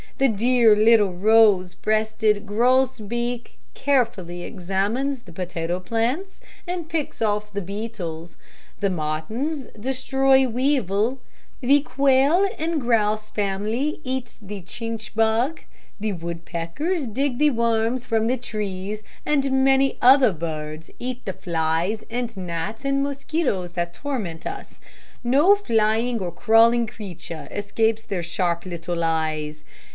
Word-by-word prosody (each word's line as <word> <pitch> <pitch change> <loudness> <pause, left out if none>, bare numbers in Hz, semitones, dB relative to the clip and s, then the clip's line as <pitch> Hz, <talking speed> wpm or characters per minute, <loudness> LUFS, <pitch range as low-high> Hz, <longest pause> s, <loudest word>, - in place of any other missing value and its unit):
The 270 - +4
dear 235 0 +4
little 215 -3 +5
rose 200 -2 +4
breasted 215 +1 +1
gross 250 +5 +2
beak 240 +3 -4 0.2
carefully 205 -11 0
examines 210 +10 -2
the 175 - -13
potato 175 0 -3
plants, 245 - -2 0.3
and 350 -2 -4
picks 310 -8 -2
off 210 -1 -1
the 200 - -2
beetles, 180 -5 -6 0.5
the 200 - +2
martins 195 - -3
destroy 265 +2 +2
weevil, 245 -2 +1 0.4
the 280 +3 +4
quail 280 +6 +3
and 320 -1 -1
grouse 215 -3 +1
family 215 +8 -1
eats 255 -1 -4
the 205 -2 -7
chinch 225 +4 -6
bug, 225 +7 +1 0.4
the 215 0 -1
woodpeckers 170 - -3
dig 250 +3 -1
the 300 0 +5
worms 235 +1 +1
from 225 -2 +1
the 255 +2 +1
trees, 210 -3 -4 0.2
and 275 -2 +1
many 270 0 +3
other 260 -2 +7
birds 155 -1 -5
eat 250 0 -5
the 190 - -3
flies 170 +5 -1
and 240 -1 -3
gnats 180 +6 -4
and 275 0 +1
mosquitoes 275 - -2
that 175 -1 -2
torment 215 - -4
us 400 +1 -7
so. - - -25 0.5
No 290 +11 +5
flying 230 - +1
or 180 -3 -3
crawling 230 +5 +4
creature 180 -9 -8
escapes 220 +2 0
their 195 -5 -3
sharp 170 0 -1
little 170 -1 -3
eyes. 155 -2 -1
220 Hz, 125 wpm, -23 LUFS, 185-260 Hz, 0.5 s, other